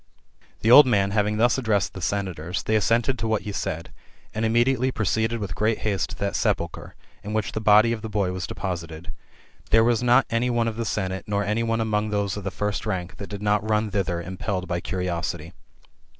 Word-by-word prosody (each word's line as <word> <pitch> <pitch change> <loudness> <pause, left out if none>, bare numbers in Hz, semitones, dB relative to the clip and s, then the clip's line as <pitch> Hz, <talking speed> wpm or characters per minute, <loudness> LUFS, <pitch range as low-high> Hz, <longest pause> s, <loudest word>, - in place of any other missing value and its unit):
The 115 - +3
old 145 +2 +10
man 100 -5 +2
having 105 0 +1
thus 120 +4 +3
addressed 110 -5 0
the 95 - -8
senators, 90 -2 -2
they 110 - 0
assented 115 +4 +2
to 115 - -1
what 110 -1 0
he 105 - -4
said; 85 -4 -4 0.4
and 110 - -2
immediately 120 +3 +2
proceeded 110 +1 0
with 100 -6 -4
great 110 +1 +1
haste 100 -5 0
to - - -7
that 100 0 -2
sepulchre, - - -2 0.3
in 105 - -5
which 110 -2 -1
the. 110 - -4
body 110 +2 +5
of 110 - -5
the 110 - -5
boy 100 -3 0
was 90 0 -4
deposited. 85 -3 -5 0.6
There 115 0 +5
was 120 -1 +2
not 125 +1 +4
any 115 +2 +1
one 120 -1 +1
of 110 -1 -3
the 115 - -2
senate, 95 -3 -2
nor 100 0 0
any 105 +3 0
one 115 0 0
among 110 -1 0
those 100 -2 -1
of 105 - -6
the 100 - -2
first 105 +2 -3
rank, 90 -3 -3
that 100 - -7
did 100 0 -6
not 105 +1 +1
run 105 0 +1
thither, 90 -4 -1
impelled 95 +2 -4
by 85 - -1
curiosity. 85 -2 -3
105 Hz, 210 wpm, -24 LUFS, 95-115 Hz, 0.6 s, old